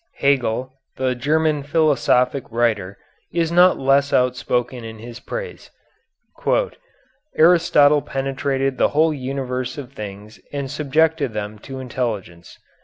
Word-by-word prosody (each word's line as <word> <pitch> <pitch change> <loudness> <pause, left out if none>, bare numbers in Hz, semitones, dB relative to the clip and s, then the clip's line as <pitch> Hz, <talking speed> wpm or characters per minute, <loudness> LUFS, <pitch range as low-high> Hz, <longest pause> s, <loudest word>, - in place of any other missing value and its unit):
Hegel, 130 -2 0 0.2
the 130 -1 0
German 150 +4 +1
philosophic 140 -4 +2
writer, 110 -5 0 0.3
is 170 -1 0
not 180 +2 +5
less 140 +1 +2
outspoken 125 -1 0
in 110 0 -8
his 115 +2 -10
praise: - - -7 1.7
"Aristotle 155 -3 +5
penetrated 135 0 -2
the - - +5
whole 160 0 +4
universe 130 -2 -4
of 135 -2 -8
things 105 -2 -9
and 140 -2 -4
subjected 150 -2 +1
them 105 0 -5
to 135 +5 -9
intelligence." 110 -10 -5
135 Hz, 110 wpm, -21 LUFS, 120-145 Hz, 1.7 s, not